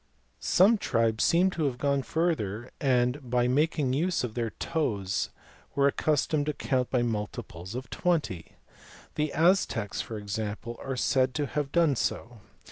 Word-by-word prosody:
Some 205 +4 +4
tribes 115 - +1
seem 180 +3 +4
to 165 -4 -1
have 130 -3 -1
gone 140 +1 +1
further 125 - -1
and 125 -1 +1
by 120 0 +2
making 145 0 +1
use 170 +3 +1
of 120 -3 -3
their 115 -1 -1
toes 105 - -2 0.5
were 140 0 +4
accustomed 150 +1 +1
to 150 - 0
count 130 -3 -1
by 125 -2 +1
multiples 105 -4 -4
of 130 0 -5
twenty. 150 - -1 0.6
The 150 -1 -1
Aztecs, 160 - +2
for 110 - -6
example, 105 +2 -4
are 135 -1 -3
said 130 0 +2
to 150 - 0
have 145 0 -3
done 165 -5 +3
so. 115 0 -3
130 Hz, 150 wpm, -28 LUFS, 115-150 Hz, 0.6 s, Some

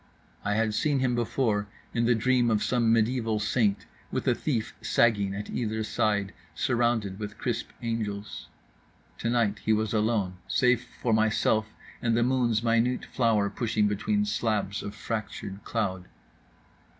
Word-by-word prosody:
I 105 0 0
had 110 0 +1
seen 145 +5 +1
him 130 -2 +1
before 115 -3 0 0.3
in 115 0 +1
the 120 0 +4
dream 120 +1 +2
of 110 -2 +2
some 120 -2 +2
mediaeval 115 -1 +2
saint, 105 -1 +1 0.3
with - - -2
a - - +5
thief 120 -8 -2
sagging 100 -4 +2
at 105 +1 -5
either 110 -2 -2
side, 105 -2 0 0.2
surrounded 120 -2 0
with 105 0 -6
crisp 120 -1 -2
angels. 110 -3 -4 0.7
Tonight 115 -3 +1
he 110 - +3
was 110 0 0
alone; 105 -4 +1
save 125 -1 +3 0.2
for 115 - +1
myself, 110 0 +2 0.3
and 115 -1 +2
the 120 - +3
moon's 120 -3 +1
minute 115 +2 +2
flower 115 -5 +2
pushing 110 0 0
between 205 - 0
slabs 110 - -1
of 100 - -6
fractured 105 -3 -5
cloud. 95 -5 -2
110 Hz, 145 wpm, -28 LUFS, 105-120 Hz, 0.7 s, a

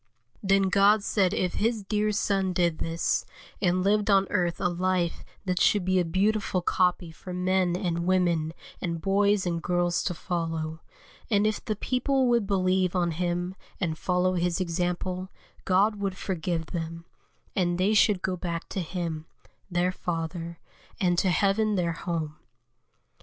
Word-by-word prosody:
Then 195 0 +3
God 200 +2 +4
said 195 -3 +2
if 180 -1 0
His 225 -1 0
dear 210 +1 0
Son 195 -2 0
did 170 -2 +1
this, 165 0 0 0.4
and 180 -1 +2
lived 205 +2 +2
on 195 -1 +5
earth 175 -4 0
a 185 - +2
life 180 -1 0 0.2
that 180 -1 0
should 205 -4 +3
be 185 0 +3
a - - +3
beautiful 190 +2 0
copy 180 -2 +1
for 170 +4 -9
men 180 -1 +1
and 175 -2 -2
women 170 -4 +2 0.3
and 170 -2 -2
boys 200 +2 +2
and 170 -1 -1
girls 175 0 +1
to 180 - -1
follow; 165 -2 -3 0.5
and 205 -2 +3
if 215 -1 0
the 215 - -2
people 260 +4 +1
would 235 -4 +2
believe 185 -2 +1
on 175 -2 +1
Him 175 +2 -2 0.3
and 170 -4 -1
follow 180 +2 +1
His 175 0 0
example, 180 +1 -2 0.4
God 200 +3 +3
would 195 -2 -3
forgive 170 -3 -3
them, 165 -1 -5 0.5
and 175 -2 +1
they 190 +4 +2
should 210 -3 +4
go 185 -1 0
back 170 -1 -4
to 190 - -2
Him, 165 -2 -4 0.4
their 180 0 +1
Father, 170 -1 -4 0.4
and 175 -2 +2
to 190 - +2
heaven 205 +4 +2
their 170 -3 0
home. 160 -3 -4
180 Hz, 160 wpm, -27 LUFS, 170-195 Hz, 0.5 s, on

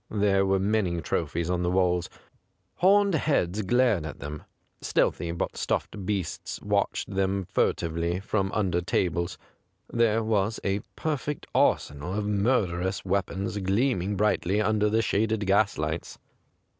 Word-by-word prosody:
There 100 -2 +2
were 95 0 +3
many 95 -3 0
trophies 80 +1 -2
on 90 -1 0
the 90 - 0
walls. 90 -1 +1 0.7
Horned 200 +1 +4
heads 110 - +1
glared 120 -3 +2
at 80 - -6
them; 75 +1 -7 0.4
stealthy 85 - 0
but 85 - -3
stuffed 95 -3 -2
beasts 100 -5 -3
watched - - -1
them 95 0 0
fur - - +2
tively 85 +2 -2
from 100 0 -1
under 90 -5 0
tables. 85 0 -1 0.6
Thei'C 115 -1 +2
was 110 0 0
a 95 +1 0 0.2
perfect 150 -1 -3
arsenal 75 +6 +1
of 105 0 -1
murderous 100 -4 0
weapons 100 +1 -1
gleaming 100 0 +1
brightly 100 -1 +1
under 105 0 +2
the 110 +2 +2
shaded 110 0 0
gaslights. 95 -5 0
95 Hz, 130 wpm, -27 LUFS, 90-110 Hz, 0.7 s, Horned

